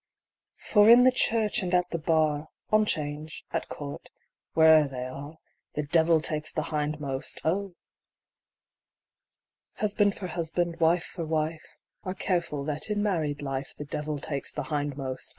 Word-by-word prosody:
For 210 Hz, -1 st, +7 dB
in 240 Hz, +2 st, +9 dB
the 255 Hz, -, +6 dB
church, 225 Hz, -4 st, +2 dB
and 180 Hz, -1 st, 0 dB
at 180 Hz, 0 st, +1 dB
the 170 Hz, -, -2 dB
bar, 155 Hz, -1 st, +1 dB, 0.2 s
On 215 Hz, 0 st, +4 dB
'Change, 150 Hz, -1 st, -3 dB
at -, -, -2 dB
court, 140 Hz, -1 st, -7 dB, 0.5 s
where'er 160 Hz, -2 st, +7 dB
they 130 Hz, -2 st, -5 dB
arc, 140 Hz, +5 st, -8 dB, 0.4 s
The 150 Hz, -, -1 dB
devil 160 Hz, +2 st, +4 dB
takes 155 Hz, 0 st, -1 dB
the 155 Hz, -, -2 dB
hindmost,! 150 Hz, -2 st, -2 dB, 2.4 s
Husband 205 Hz, -1 st, +1 dB
for 195 Hz, -, -5 dB
husband, 170 Hz, 0 st, -2 dB
wife 165 Hz, +1 st, +3 dB
for 170 Hz, -, -6 dB
wife, 160 Hz, 0 st, -3 dB, 0.2 s
Are 185 Hz, 0 st, -5 dB
careful 170 Hz, -7 st, -1 dB
that 150 Hz, +6 st, -3 dB
in 205 Hz, -1 st, 0 dB
married 155 Hz, -8 st, -1 dB
life 135 Hz, 0 st, -4 dB
The 145 Hz, -, -6 dB
devil 150 Hz, +1 st, -3 dB
takes 140 Hz, -1 st, -4 dB
the 150 Hz, -, -4 dB
hindmost 140 Hz, -3 st, -2 dB
155 Hz, 145 wpm, -27 LUFS, 145-180 Hz, 2.4 s, in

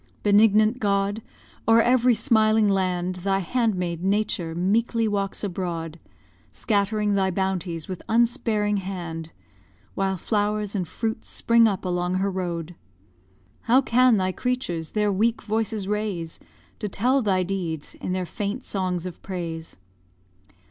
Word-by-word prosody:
Benignant 215 Hz, +3 st, +4 dB
God! 200 Hz, 0 st, 0 dB, 0.5 s
o'er 225 Hz, 0 st, +6 dB
every 245 Hz, 0 st, +4 dB
smiling 220 Hz, -2 st, +3 dB
land, 185 Hz, -2 st, 0 dB
Thy 195 Hz, +2 st, 0 dB
handmaid, 185 Hz, -5 st, -1 dB
Nature, 195 Hz, -4 st, 0 dB
meekly 225 Hz, +5 st, +1 dB
walks 200 Hz, -1 st, -2 dB
abroad, 170 Hz, -4 st, -4 dB, 0.5 s
Scattering 210 Hz, 0 st, 0 dB
thy 190 Hz, -1 st, +2 dB
bounties 185 Hz, -3 st, -2 dB
with 185 Hz, -2 st, -6 dB
unsparing 225 Hz, -3 st, +2 dB
hand, 170 Hz, -4 st, -5 dB, 0.6 s
While 195 Hz, -1 st, -1 dB
flowers 210 Hz, +1 st, -1 dB
and 185 Hz, -5 st, -2 dB
fruits 225 Hz, +5 st, -4 dB
spring 230 Hz, -1 st, +4 dB
up 195 Hz, -3 st, -2 dB
along 180 Hz, 0 st, -1 dB
her 195 Hz, +1 st, 0 dB
road. 175 Hz, -2 st, -4 dB, 1.0 s
How 250 Hz, +3 st, +7 dB
can 250 Hz, -2 st, +4 dB
thy 185 Hz, -1 st, +1 dB
creatures 185 Hz, -9 st, -2 dB
their 210 Hz, -1 st, +2 dB
weak 225 Hz, +4 st, +1 dB
voices 215 Hz, -1 st, -1 dB
raise 205 Hz, -6 st, -3 dB, 0.4 s
To 210 Hz, -, -3 dB
tell 255 Hz, +8 st, +2 dB
thy 190 Hz, -4 st, +1 dB
deeds 175 Hz, -5 st, -4 dB
in -, -, -5 dB
their 185 Hz, 0 st, -1 dB
faint 205 Hz, -, -4 dB
songs 185 Hz, -3 st, -2 dB
of 180 Hz, -3 st, -7 dB
praise? 165 Hz, -, -6 dB
200 Hz, 130 wpm, -24 LUFS, 180-220 Hz, 1.0 s, How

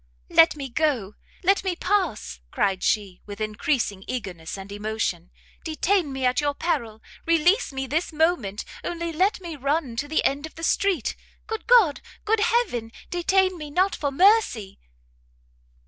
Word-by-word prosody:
"Let 325 Hz, -1 st, +6 dB
me 280 Hz, -2 st, -5 dB
go! 250 Hz, -7 st, 0 dB, 0.3 s
let 390 Hz, +2 st, +3 dB
me 375 Hz, -2 st, -1 dB
pass!" 355 Hz, -, -1 dB
cried 190 Hz, -, 0 dB
she, 200 Hz, -4 st, 0 dB
with 205 Hz, 0 st, -8 dB
encreasing 215 Hz, -1 st, -1 dB
eagerness 190 Hz, -9 st, -5 dB
and 195 Hz, +1 st, -9 dB
emotion; 205 Hz, -4 st, -3 dB, 0.3 s
"detain 330 Hz, 0 st, 0 dB
me 265 Hz, -1 st, -2 dB
at 250 Hz, +3 st, +2 dB
your 290 Hz, -1 st, 0 dB
peril! 230 Hz, -11 st, -2 dB, 0.2 s
release 335 Hz, +6 st, +3 dB
me 270 Hz, 0 st, -3 dB
this 315 Hz, +7 st, -1 dB
moment 305 Hz, -, 0 dB, 0.2 s
only 340 Hz, -1 st, -3 dB
let 375 Hz, +6 st, +2 dB
me 340 Hz, -3 st, -6 dB
run 280 Hz, -2 st, -1 dB
to 290 Hz, -, -2 dB
the 315 Hz, -, +1 dB
end 285 Hz, +3 st, 0 dB
of -, -, -18 dB
the 330 Hz, -, -9 dB
street, 370 Hz, -, +1 dB, 0.3 s
good 445 Hz, -1 st, -5 dB
God! 425 Hz, -, +5 dB, 0.2 s
good 445 Hz, +1 st, +2 dB
Heaven! 415 Hz, -, +1 dB, 0.2 s
detain 370 Hz, 0 st, +2 dB
me 300 Hz, -1 st, -6 dB
not 360 Hz, +4 st, +2 dB
for 285 Hz, -, -1 dB
mercy!" 355 Hz, -, +3 dB
295 Hz, 155 wpm, -24 LUFS, 220-355 Hz, 0.3 s, Let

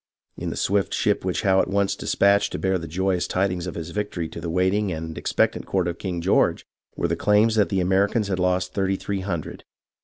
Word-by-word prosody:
In -, -, -4 dB
the -, -, -5 dB
swift 100 Hz, 0 st, +1 dB
ship -, -, +1 dB
which -, -, -1 dB
Howe 95 Hz, -1 st, +4 dB
at -, -, -2 dB
once 100 Hz, 0 st, +1 dB
despatched 100 Hz, +1 st, +2 dB
to -, -, -2 dB
bear 95 Hz, -1 st, 0 dB
the 85 Hz, -, -7 dB
joyous 95 Hz, +2 st, 0 dB
tidings 90 Hz, -2 st, -1 dB
of 85 Hz, -, -5 dB
his 85 Hz, 0 st, -6 dB
victory 100 Hz, -5 st, -3 dB
to -, -, -8 dB
the 85 Hz, -, -4 dB
waiting 95 Hz, +3 st, +1 dB
and 80 Hz, -1 st, -5 dB
expectant -, -, 0 dB
court 95 Hz, -2 st, 0 dB
of 85 Hz, -1 st, -4 dB
King 90 Hz, -3 st, -3 dB
George, 95 Hz, +4 st, +2 dB, 0.3 s
were -, -, 0 dB
claims 105 Hz, +2 st, +3 dB
that 105 Hz, -2 st, +2 dB
the 95 Hz, -2 st, +1 dB
Americans 100 Hz, +4 st, +2 dB
had 95 Hz, -2 st, -2 dB
lost 90 Hz, 0 st, 0 dB
thirty 95 Hz, -1 st, 0 dB
three 100 Hz, +1 st, -3 dB
hundred. 90 Hz, -5 st, -5 dB
95 Hz, 215 wpm, -24 LUFS, 90-100 Hz, 0.3 s, Howe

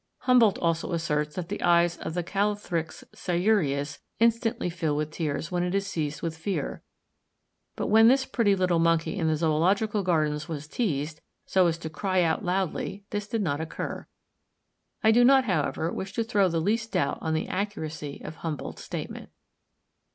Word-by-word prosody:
Humboldt 240 Hz, -5 st, +5 dB
also 165 Hz, 0 st, -1 dB
asserts 150 Hz, -3 st, -1 dB
that 175 Hz, -2 st, -4 dB
the -, -, -4 dB
eyes 170 Hz, 0 st, +4 dB
of 160 Hz, -, -5 dB
the 175 Hz, -, 0 dB
Callithrix 195 Hz, -3 st, -2 dB
sciureus 170 Hz, -7 st, 0 dB, 0.2 s
"instantly 230 Hz, -3 st, +2 dB
fill 165 Hz, -4 st, -1 dB
with 150 Hz, 0 st, -2 dB
tears 155 Hz, 0 st, -3 dB
when 175 Hz, -1 st, 0 dB
it 180 Hz, +2 st, -1 dB
is 200 Hz, 0 st, +1 dB
seized 155 Hz, -6 st, -3 dB
with 165 Hz, -1 st, -2 dB
fear;" 160 Hz, -3 st, -3 dB, 0.9 s
but -, -, -2 dB
when 220 Hz, +2 st, +6 dB
this 265 Hz, +2 st, +4 dB
pretty 205 Hz, -6 st, +2 dB
little 180 Hz, -3 st, +2 dB
monkey 165 Hz, +2 st, +2 dB
in 170 Hz, -5 st, 0 dB
the 160 Hz, -, +2 dB
Zoological 185 Hz, +7 st, +2 dB
Gardens 155 Hz, -3 st, 0 dB
was 150 Hz, -2 st, -5 dB
teased, 155 Hz, -, -2 dB, 0.2 s
so 185 Hz, -2 st, +3 dB
as 165 Hz, -1 st, 0 dB
to 165 Hz, -, -6 dB
cry 185 Hz, +4 st, 0 dB
out 160 Hz, -1 st, 0 dB
loudly, 190 Hz, +2 st, -2 dB
this 205 Hz, 0 st, -3 dB
did 225 Hz, -1 st, -1 dB
not 150 Hz, -3 st, -1 dB
occur. 160 Hz, -, -5 dB, 1.0 s
I 220 Hz, -, +6 dB
do 240 Hz, +2 st, +5 dB
not, 265 Hz, +1 st, +6 dB
however, 165 Hz, -, 0 dB
wish 195 Hz, 0 st, -5 dB
to 230 Hz, -, 0 dB
throw 205 Hz, -4 st, +2 dB
the 165 Hz, -1 st, 0 dB
least 220 Hz, +6 st, -1 dB
doubt 140 Hz, -, 0 dB
on 160 Hz, 0 st, -1 dB
the 160 Hz, -, -1 dB
accuracy 160 Hz, -7 st, -4 dB
of 155 Hz, -, -7 dB
Humboldt's 160 Hz, -3 st, -5 dB
statement. -, -, -6 dB
175 Hz, 175 wpm, -27 LUFS, 160-205 Hz, 1.0 s, when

